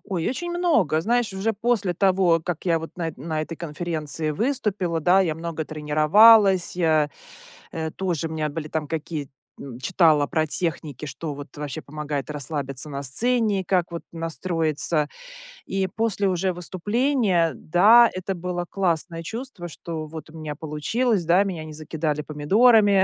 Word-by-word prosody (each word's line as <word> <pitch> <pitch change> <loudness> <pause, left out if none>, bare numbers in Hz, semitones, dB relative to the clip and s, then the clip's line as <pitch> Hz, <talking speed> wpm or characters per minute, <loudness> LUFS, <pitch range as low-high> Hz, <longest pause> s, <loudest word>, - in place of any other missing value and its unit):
Ой, 180 -5 -2
очень 345 +7 -3
много! 310 - +2
Знаешь, 235 +4 +1
уже 195 +4 -1
после 215 -4 0
того, 185 -2 +3
как 175 -3 -4
я 170 -3 +2
вот 160 0 -7
на 165 -3 -3
на 155 +3 -3
этой 165 +1 -7
конференции 155 -1 -3
выступила, 200 - -1
да, 180 +5 +4
я 170 -5 +1
много 165 0 -4
тренировалась, 175 +7 +5
я, 155 -4 +2 0.6
э, 160 -1 -4
тоже 175 -4 -2
у - - -9
меня 155 -1 -2
были 155 +1 -5
там 155 -1 -3
какие 155 -2 -4 0.5
читала 160 -4 +3
про 155 +1 0
техники. 155 -3 -3
Что 145 +3 -5
вот 145 +1 -10
вообще 145 -3 -5
помогает 150 -2 -5
расслабиться 140 -1 -4
на 140 -1 -4
сцене, 215 - +1
как 180 -2 +1
вот 170 - -6
настроиться. 165 -2 -1 0.6
И 190 -1 -1
после 205 -1 -1
уже 185 0 0
выступления, 190 - 0
да, 215 +9 +6
это 185 +1 -3
было 175 0 -3
классное 170 -3 -1
чувство, 225 -2 -6
что 160 -1 -6
вот 155 0 -9
у 160 - -12
меня 155 -2 -5
получилось, 170 - -1
да. 175 +4 +4
Меня 175 -6 -4
не 155 - -9
закидали 155 0 -3
помидорами. 200 +7 +4
170 Hz, 155 wpm, -24 LUFS, 155-195 Hz, 0.6 s, да